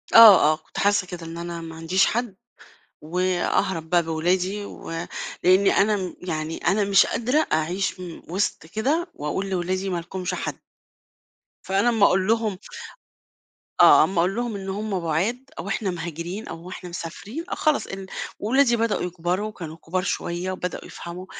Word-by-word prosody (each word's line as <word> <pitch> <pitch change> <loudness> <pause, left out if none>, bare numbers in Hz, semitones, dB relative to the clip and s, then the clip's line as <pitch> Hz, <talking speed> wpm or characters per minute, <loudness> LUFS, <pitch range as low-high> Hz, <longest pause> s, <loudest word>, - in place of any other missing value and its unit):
آه، 200 -9 +10
آه، - - -2
كنت - - -15
حاسّة 200 -2 +2
كده 175 -2 -7
إن 165 +1 -7
أنا 170 0 -5
ما 165 -1 -8
عنديش 175 +4 +2
حد 235 -4 -1 0.7
وأهرب 180 0 0
بقى 175 0 +4
بولادي، 180 +5 0
ولإن 185 +3 0
أنا 210 +1 +3
م 185 -2 -5
يعني 160 -2 -3
أنا 200 +3 +1
مش 195 0 +5
قادرة 255 +7 +1
أعيش 180 +5 0
م 175 -3 -8
وِسط 190 -1 -1
كده 290 - -1
وأقول 190 +7 -3
لولادي 185 +1 -1
ما 180 - -1
لكمش 180 +2 -4
حد. - - -4 1.0
فأنا 195 +5 +2
أمّا 225 -4 +4
أقول 190 +1 +3
لهم 220 -3 +1 1.2
آه، - - +8
أمّا 190 -3 0
أقول 180 +3 +2
لهم 240 -3 -2
إن 195 -1 -5
هم 200 -1 -2
بُعاد 180 +11 -1 0.2
أو - - -5
إحنا 200 -5 -1
مهاجرين 170 +4 -5
أو 170 +2 -8
إحنا 180 -1 -8
مسافرين، 200 - -6
آه، - - -2
خلاص 305 -2 +1
ال 195 0 -6 0.3
ولادي 240 +3 +3
بدؤوا 230 -1 0
يكبروا 180 +3 -2
وكانوا 165 -6 -8
كُبار 180 +3 -2
شوية 180 0 -2
وبدؤوا 180 -2 -4
يفهموا 175 +2 -8
185 Hz, 160 wpm, -24 LUFS, 170-205 Hz, 1.2 s, آه